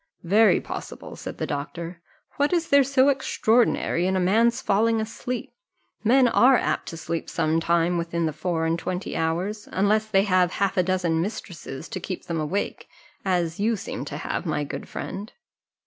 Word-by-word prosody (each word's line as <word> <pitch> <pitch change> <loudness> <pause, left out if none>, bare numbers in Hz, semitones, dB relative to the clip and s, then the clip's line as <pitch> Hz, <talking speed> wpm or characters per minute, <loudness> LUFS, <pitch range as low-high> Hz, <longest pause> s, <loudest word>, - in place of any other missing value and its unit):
"Very 205 +3 +5
possible," - - -7
said - - -7
the - - -2
doctor: 165 +4 -5 0.4
"what 285 +1 +2
is 340 -2 +1
there 280 0 +6
so 270 +1 +4
extraordinary 235 -8 +2
in 190 - +1
a - - +2
man's 230 +7 +3
falling 225 -1 +2
asleep? 235 +2 -4 0.5
Men 250 +3 +5
are 250 +2 +5
apt - - -1
to 165 - -6
sleep 165 0 -4
sometime 165 +2 +1
within 170 0 -1
the 155 - -1
four 165 +1 -1
and 165 +1 0
twenty 180 +2 -4
hours, 180 +6 -2
unless 215 +3 +2
they 195 -2 +3
have 185 -3 +2
half 200 -1 0
a 185 - +4
dozen 180 -3 0
mistresses 175 -6 -6
to - - -4
keep 185 0 -6
them 170 -1 -2
awake, 170 +7 -3 0.4
as 175 -3 0
you 225 +3 +2
seem 200 - -5
to - - -6
have, - - -3
my 150 - -1
good 145 - -6
friend." 205 +3 -6
185 Hz, 175 wpm, -25 LUFS, 170-220 Hz, 0.5 s, there